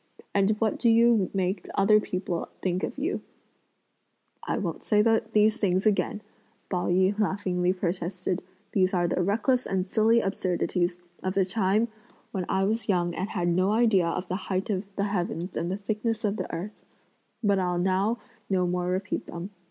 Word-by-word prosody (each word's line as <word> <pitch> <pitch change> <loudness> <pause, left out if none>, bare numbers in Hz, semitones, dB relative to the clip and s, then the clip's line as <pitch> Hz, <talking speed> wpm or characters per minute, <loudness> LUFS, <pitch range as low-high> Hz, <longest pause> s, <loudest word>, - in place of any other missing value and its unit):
and 200 +1 +3
what 220 -3 0
do 235 - +3
you 230 -3 +4
make 185 -1 -1
other 210 +2 +5
people 185 -4 -3
think 185 0 0
of - - -3
you?" 310 +7 -1 1.3
"I - - 0
won't - - -3
say 210 -1 +3
these 220 -1 +3
things 190 -1 +1
again," 210 0 +1 0.5
Pao 180 -2 0
yü 190 +3 +2
laughingly 185 -3 +1
protested, 180 0 -2 0.3
"these 185 -1 +2
are 175 -1 +2
the 180 - 0
reckless 230 +7 +1
and 190 0 -1
silly 225 +4 +4
absurdities 180 -2 0 0.2
of 185 +1 -2
a 190 - +4
time 205 +3 +1 0.4
when 185 -3 -3
I 190 - +2
was 220 +2 -1
young 175 -3 +2
and 185 +4 -3
had 175 -4 -1
no 185 +3 +2
idea 215 -5 +3
of 180 +2 -2
the 185 +3 -4
height 190 +2 0
of 195 0 -1
the 200 - 0
heavens 180 -3 -2
and 170 - -1
the 190 - -2
thickness 215 +2 -2
of 205 +1 0
the - - -4
earth; 200 +6 -6 0.6
but 200 -2 +3
I'll 180 -1 0
now 190 +5 +1 0.3
no 185 -2 +2
more 180 0 -1
repeat 185 +1 -2
them. 175 +4 -6
190 Hz, 175 wpm, -27 LUFS, 180-210 Hz, 1.3 s, other